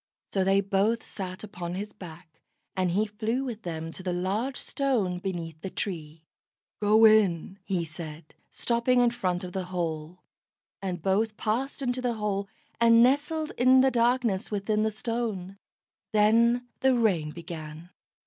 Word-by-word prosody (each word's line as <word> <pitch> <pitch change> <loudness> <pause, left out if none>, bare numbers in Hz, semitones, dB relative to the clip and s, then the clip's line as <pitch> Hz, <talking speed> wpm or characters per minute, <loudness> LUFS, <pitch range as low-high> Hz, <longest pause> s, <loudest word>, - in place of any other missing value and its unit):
So 195 - +2
they 195 +1 +4
both 200 +4 +1
sat 185 -1 -6
upon 180 -4 -5
his 205 +2 -5
back, 170 -4 -12 0.3
and 185 -1 +1
he 200 +5 +2
flew 220 +4 -2
with 235 -5 -5
them 165 -3 -5
to 185 - -8
the 185 -1 -2
large 200 +9 -1
Stone 225 -11 0
beneath 170 -4 -5
the 190 - -4
tree. 160 -5 -5 0.6
"Go 215 +2 +6
in," 200 -4 +4
he 180 -4 -1
said, 155 -1 -9 0.2
stopping 240 +1 +1
in 240 -1 +4
front 180 -6 -2
of 180 -1 -7
the 190 -1 -2
hole; 170 -1 -4 0.6
and 180 -4 -4
both 210 +3 +1
passed 255 +6 -2
into 250 0 -1
the 245 -2 0
hole, 200 -2 -2 0.3
and 230 0 +6
nestled 300 +4 +1
in 255 +1 +6
the 265 0 +4
darkness 235 -4 +1
within 210 +1 0
the 220 - +2
Stone. 215 -4 -4 0.5
Then 230 +3 +4
the 265 -1 +3
rain 185 -10 +2
began. 165 0 -8
200 Hz, 155 wpm, -27 LUFS, 180-235 Hz, 0.6 s, Go